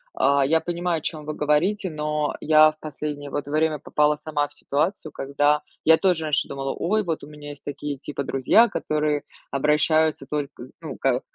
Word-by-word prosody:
А, 140 0 +3
я 160 +4 +3
понимаю, 175 0 -1
о - - -17
чём 155 -1 -4
вы 155 - -3
говорите, 180 +7 +1
но 150 -1 -1
я 155 0 +6
в 155 - -25
последнее, 150 -1 -5
вот, 145 +1 -2
время 155 +1 +1
попала 150 +2 +2
сама 150 -1 -2
в - - -18
ситуацию, 155 +2 -2
когда 145 +2 +1 0.2
я 160 0 +7
тоже 175 -4 +1
раньше 155 -1 +1
думала: 135 0 -3
ой, 215 +4 0
вот 165 -4 -3
у - - -9
меня 150 -1 -10
есть 145 -1 -10
такие, 145 0 -5
типа, 140 +1 -5
друзья, 135 - +4
которые 150 -1 -1 0.3
обращаются 150 +1 +2
только 145 -4 -4
с 130 - -17
ну 155 -5 -7
как, 130 -1 +1
150 Hz, 190 wpm, -24 LUFS, 145-160 Hz, 0.3 s, я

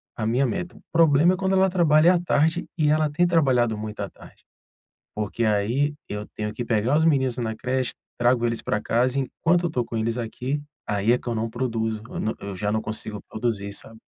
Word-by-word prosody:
a 110 - -3
minha 120 +5 +2
meta. 180 +6 -3
O - - -17
problema 165 +1 +5
é - - -2
quando 190 0 0
ela 190 0 +4
trabalha 170 -1 +5
à - - +2
tarde, 160 0 +1
e 155 -3 +3
ela 155 0 +3
tem 155 +5 +2
trabalhado 130 -9 +2
muito 105 0 -6
à 100 - -3
tarde, - - -17 0.7
porque 105 +2 -1
aí 115 +8 +1 0.2
eu 105 0 -5
tenho 105 0 -3
que 120 - -4
pegar 115 +5 +2
os 160 - +3
meninos 130 -6 +2
na 115 -3 -2
creche, 130 +2 -1 0.3
trago 120 0 +3
eles 115 -1 0
pra 105 - -1
casa 125 +3 +1
e - - +1
enquanto 170 +6 +1
eu - - +2
estou 125 -7 -1
com 115 - -6
eles 115 +2 -1
aqui, 125 +5 -3 0.3
aí 105 +3 +2
é - - +3
que - - -14
eu 120 - 0
não 115 +1 -1
produzo, 115 -3 -2
eu - - -5
na 110 - -1
eu 100 -1 -6
já 105 +2 -1
não 110 0 0
consigo 110 -1 -5
produzir, 110 -3 -2
sabe. 110 +2 -5
120 Hz, 225 wpm, -24 LUFS, 110-150 Hz, 0.7 s, problema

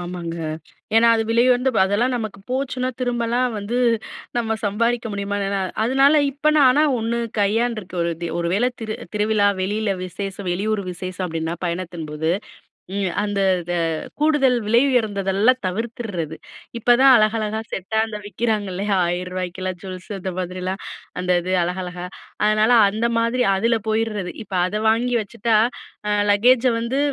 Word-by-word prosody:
ஆமாங்க. 175 -1 -5 0.6
ஏனா, 230 +1 +6
அது 225 - +1
விலை 235 +1 +4
உயர்ந்த 250 +1 +3
அதெல்லாம் 225 +6 +1
நமக்கு 220 -4 -4
போச்சுனா 255 -1 -1
திரும்பலாம் 245 0 0
வந்து 205 +4 -3 0.6
நம்ம 225 -2 0
சம்பாரிக்க 230 +3 0
முடியுமா? 200 0 -3
எனா 195 0 -1 0.2
அதனால, 270 +4 +4 0.2
இப்ப 290 +3 0
நான் 275 -3 +7
ஆனா 295 +4 +3 0.2
1 230 +1 -1 0.2
கையான்றுக்க, 215 -1 0
ஒரு 170 - 0 0.3
ஒரு 170 0 -1
வேள 240 +5 +2
திரு 220 -1 -3 0.2
திருவிழா, 210 -1 +2
வெளியில 205 +2 -1
விசேஷம், 195 +1 -5
வெளியூர் 205 +3 -1
விசேஷம் 185 +1 -5
அப்டின்னா 165 0 -3
பயணத்தின்போது, 165 -3 -3 0.7
ம். 195 -3 0
அந்த 205 -1 -2 0.2
இத 175 +1 -4 0.5
கூடுதல் 280 -5 +3
விலை 235 +3 +5
உயர்ந்ததெல்லாம் 215 0 +2
தவிர்த்திறது. 200 -6 -4 0.4
இப்பதான் 250 +3 +6
அழகழகா 215 0 +1
செட்டா 205 +4 -1
அந்த 210 -1 -5
விக்கிறாங்க 215 -1 -1
இல்லையா? 200 +2 -1
1000ரூவாக்குகெல்லாம் 180 +1 -3
ஜூவல்ஸு 185 +1 -8
அந்த 190 - -3
மாதிரிலாம். 185 +1 -4 0.4
அந்த 180 0 0
இது 185 +1 -2
அழகழகா. 180 0 -4 0.4
அதனால 215 +2 +3 0.2
அந்த 220 +3 -2
மாதிரி 240 +2 +1
அதில 230 +4 +2
போயிறது. 215 -4 -1
இப்ப 195 - -11
அத 185 - -4
வாங்கி 240 +3 +1
வச்சுட்டா 225 +2 -1 0.5
அ - - +1 0.2
லக்கேஜை 245 +4 +4
வந்து 235 +4 -2
210 Hz, 140 wpm, -21 LUFS, 185-235 Hz, 0.7 s, நான்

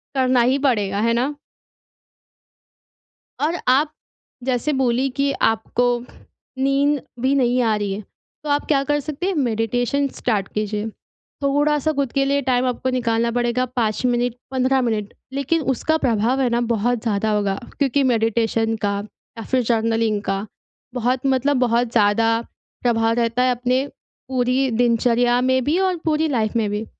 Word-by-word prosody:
करना 255 -2 +3
ही 255 +3 +3
पड़ेगा। 210 -8 +1
है 230 +1 +2
ना? 260 +5 0 2.1
और 325 +4 0
आप 290 +4 +3 0.5
जैसे 260 +3 0
बोली 260 -1 +1
कि 280 0 +1
आपको 225 +2 +1 0.7
नींद 275 +2 +2 0.2
भी 260 +3 +2
नहीं 250 -2 +2
आ 220 -2 +2
रही 205 -2 -2
है, 205 - -5 0.4
तो 300 - -3
आप 285 0 +1
क्या 280 -3 +3
कर 295 +1 0
सकते 305 +5 -4
हैं 390 - 0
मेडिटेशन 245 +1 0
स्टार्ट 205 -5 0
कीजिए। 210 0 -2 0.5
थोड़ा-सा 290 +2 +2
ख़ुद 280 -4 -2
के 275 -1 +2
लिए 280 +1 +1
टाइम 255 -1 +1
आपको 250 +1 -2
निकालना 235 -2 0
पड़ेगा 240 +1 +1
5 220 -1 0
मिनट, 245 -1 0 0.2
15 260 0 +2
मिनट 215 -4 -2 0.2
लेकिन 280 +4 0
उसका 315 +5 0
प्रभाव 240 +1 +1
है 255 - +2
ना, 235 0 +1
बहुत 235 0 0
ज़्यादा 215 -1 0
होगा। 200 -2 0 0.2
क्योंकि 280 0 +2
मेडिटेशन 225 0 +1
का 200 0 0 0.4
या 225 - -6
फिर 255 -1 +1
जर्नलिंग 225 -2 +1
का 195 0 -2 0.5
बहुत 250 +1 0
मतलब 270 +1 +2
बहुत 240 -1 +1
ज़्यादा 225 +1 +3 0.4
प्रभाव 225 -2 +2
रहता 235 +1 +1
है, 255 - +3
अपने 250 +2 0 0.4
पूरी 255 +1 +1
दिनचर्या 240 +1 +2
में 260 0 +2
भी 305 +6 +1
और 375 -1 +1
पूरी 315 0 +1
लाइफ़ 230 -4 0
में 215 -2 0
भी। 210 +2 -3
245 Hz, 155 wpm, -21 LUFS, 225-270 Hz, 2.1 s, करना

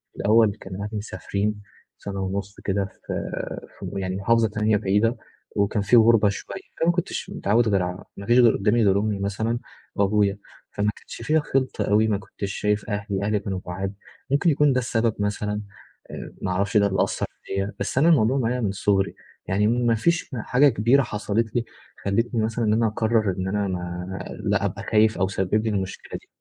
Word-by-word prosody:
الأول 110 -1 +4
كان 95 -1 -7
أهلي 100 +2 -4
مسافرين 105 0 -3 0.4
سَنة 100 -1 -6
ونُص 100 +1 -4
كده 100 0 0
في 95 - -15 0.8
في - - -6
م 100 - -5
يعني 95 -1 -2
محافظة 115 +3 +3
تانية 105 0 +1
بعيدة، 105 +5 +1 0.4
وكان 100 +1 +1
في 100 +5 +3
غربة 115 -2 +6
شوية، 100 - -6 0.2
فما 165 +1 +4
كنتش 175 0 -3
متعوّد 115 +3 +1
غير 100 -3 +2
ع 90 +1 -5
ما 100 - -7
فيش 120 +3 +5
قدّامي 115 -1 +4
غير 100 0 +4
أمي 105 -1 -1
مثلًا 110 +4 -1 0.4
وأبويا، 100 0 +2 0.3
فما 105 +1 0
كانش - - -11
فيها 155 +7 +2
خلطة 135 -3 -1
أوي 105 +2 +4
ما 105 -2 +1
كنتش 100 0 -6
شايف 105 +1 -1
أهلي، 100 -2 -2
أهلي 105 0 +1
كانوا 95 -2 -4
بعاد، 95 +2 -4 0.4
ممكن 145 +5 +3
يكون 145 -2 +4
ده 130 - +2
السبب 115 -2 0
مثلًا، 105 0 -1 0.5
آآ - - -7
ما 95 - -1
أعرفش 100 +4 +1
ده 100 -1 +5
اللي 95 -1 +1
أثّر - - -2 0.2
فيّا، 95 +1 -3
بس - - -3
أنا 155 +5 +5
الموضوع 130 -5 +4
معايا 125 0 0
من 105 -4 0
صغري، 100 0 +1 0.3
يعني 100 +3 +1
ما 120 0 +2
فيش 170 +9 +1
حاجة 125 +5 +4
كبيرة 120 +3 +3
حصلت 110 0 -2
لي، 120 -1 +1 0.4
خلّتني 115 +4 +1
مثلًا 115 +1 -1
إن 105 - +3
أنا 115 +1 +3
أقرّر 110 -1 +1
إن 95 0 -2
أنا 100 +1 0
ما 90 +1 -4 0.2
لأ - - +1
أبقى - - -3
خايف 110 0 +3
أو 95 - +2
سبِّب 100 +2 0
لي - - +1
المشكلة 95 -3 -4
دي. - - -26
105 Hz, 190 wpm, -24 LUFS, 100-115 Hz, 0.8 s, غربة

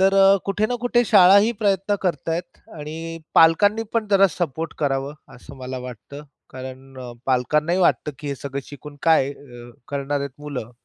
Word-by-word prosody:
तर 195 +1 +4
अ, 195 0 +6
कुठे 205 +2 0
ना 245 - -2
कुठे 245 0 +2
शाळाही 200 +1 +6
प्रयत्न 200 0 +1
करत 180 -3 -2
आहेत 170 +2 -4 0.2
आणि 165 +2 -7 0.2
पालकांनी 205 +7 +5
पण 225 -2 0
जरा 195 0 +6
सपोर्ट 165 -1 -4
करावं 140 0 -1 0.2
असं 135 +3 -13
मला 130 0 -6
वाटतं. 125 +3 -9 0.3
कारण 130 0 -10 0.3
पालकांनाही 150 +7 +1
वाटतं, 155 -3 +2
की 150 - -7
हे 140 - -2
सगळं 140 +1 -5
शिकून 145 0 -11
काय 150 -4 +3 0.6
करणार 140 0 -2
आहेत 140 0 -7
मुलं? 140 -6 -6
150 Hz, 160 wpm, -22 LUFS, 140-195 Hz, 0.6 s, अ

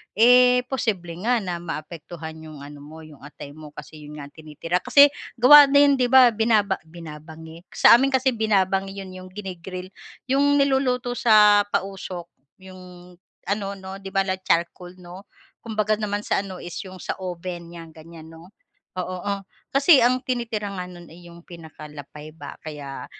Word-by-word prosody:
eh 250 +3 +5
posible 215 -10 -2 0.2
nga 245 0 +3
na 175 -2 -4
maapektuhan 160 0 -8
'yong 155 -3 -11
ano 145 0 -11
mo, 155 +3 -12
'yong 155 -2 -15
atay 145 -1 -11
mo, 155 +1 -12
kasi 150 +1 -11
'yon 150 0 -11
nga 145 -1 -10
ang - - -57
tinitira. 160 +3 -4
Kasi 285 +8 +5 0.2
gawa 285 +4 +8
din, 280 0 +4
'di 250 - +2
ba, 255 -1 +6
binaba 215 -3 +1
binabangi, 160 +1 -12
sa 235 - +7
amin 270 +1 +1
kasi 260 0 +2
binabangi 195 -4 0
'yon, 190 -1 -8
'yong 185 0 -11
gini-grill, 185 -2 -8 0.4
'yong 285 +1 +3
niluluto 265 -3 +1
sa 210 -4 +5
pausok, 190 -3 -5 0.3
'yong 180 -1 -14 0.3
ano 200 +1 -2
'no, 190 0 -10
'di 195 0 -9
ba 195 - +3
like 190 -1 -4
charcoal 175 +2 -1
'no. 180 +2 -13 0.3
Kumbaga 215 -2 -1
naman 205 -1 -3
sa - - 0
ano, 190 -2 -9
is 175 -1 -9
'yong 185 -1 -11
sa - - -3
oven 175 -1 -7
nyan, 165 -1 -11
ganyan 160 0 -13
'no, 165 +2 -15 0.5
oo. 185 0 -4
Oh, 200 0 -3 0.3
kasi 280 +2 +5
ang 250 +2 +3
tinitira 230 -5 -3
nga 180 -2 -5
no'n 175 -2 -13
ay 175 +1 -15
'yong 170 0 -15
pinakalapay 150 -2 -12
ba, 160 - -10
kaya 145 -3 -8
185 Hz, 170 wpm, -23 LUFS, 165-220 Hz, 0.5 s, gawa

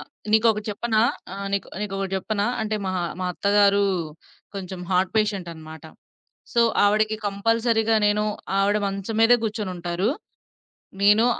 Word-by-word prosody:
ఆ! - - -8 0.3
నీకొకటి 220 -1 +3
చెప్పనా? 220 +1 0 0.3
ఆ! - - -5 0.2
నీకొ 200 - -1
నీకొకటి 195 -2 -3
చెప్పనా? 205 +1 -1 0.2
అంటే, 215 0 -1
మా 185 - -1 0.3
మా 185 - -1
అత్తగారూ 200 +1 +3 0.7
కొంచెం 190 -2 -6
హార్ట్ 185 0 +1
పేషెంటనమాట. 170 -7 -3 0.7
సో, 235 - +3 0.2
ఆవిడకి 215 +1 +2
కంపల్సరీగా 225 +2 +1
నేను 210 +1 +2 0.3
ఆవిడ 200 +1 +2
మంచం 195 +2 -4
మీదే 230 +2 +6
గూర్చొనుంటారు. 185 -3 -2 0.9
నేను 210 +3 +6
205 Hz, 120 wpm, -24 LUFS, 190-220 Hz, 0.9 s, మీదే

